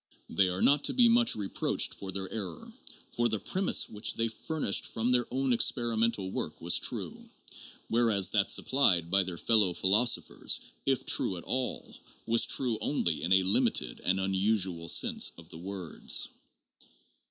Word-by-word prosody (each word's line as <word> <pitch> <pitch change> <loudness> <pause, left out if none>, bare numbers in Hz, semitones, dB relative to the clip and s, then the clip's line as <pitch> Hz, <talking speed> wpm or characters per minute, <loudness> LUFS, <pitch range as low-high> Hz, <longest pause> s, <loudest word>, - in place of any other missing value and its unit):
They 95 - +2
are 90 +1 -3
not 145 +1 +4
to - - +2
be 245 -2 +5
much 235 0 +3
reproached 100 -2 -2
for 95 -1 -8
their 95 0 -4
error; 95 -8 -7 0.4
for 120 0 0
the 110 -1 -1
premise 190 - +1
which 105 0 -2
they 115 0 0
furnished 150 - -2
from 115 +2 -2
their 125 -1 +1
own 130 0 0
experimental 115 -4 0
work 75 - -4
was 85 +1 +2
true, - - -4 0.6
whereas 115 -5 +2
that 100 -2 +1
supplied 90 -11 +2
by 100 - +6
their 90 -2 -4
fellow 105 -4 +2
philosophers, 105 +8 +1 0.3
if 135 -2 +1
true 95 - +1
at 85 - -9
all, 130 0 -3 0.3
was 115 0 +2
true 120 -5 0
only 85 - -1
in 85 - -3
a 95 0 +4
limited 90 -9 0
and 95 +1 -1
unusual 95 -3 0
sense - - +2
of 85 -1 -15
the 80 - -9
words. 95 -3 -1
100 Hz, 160 wpm, -29 LUFS, 95-120 Hz, 0.6 s, by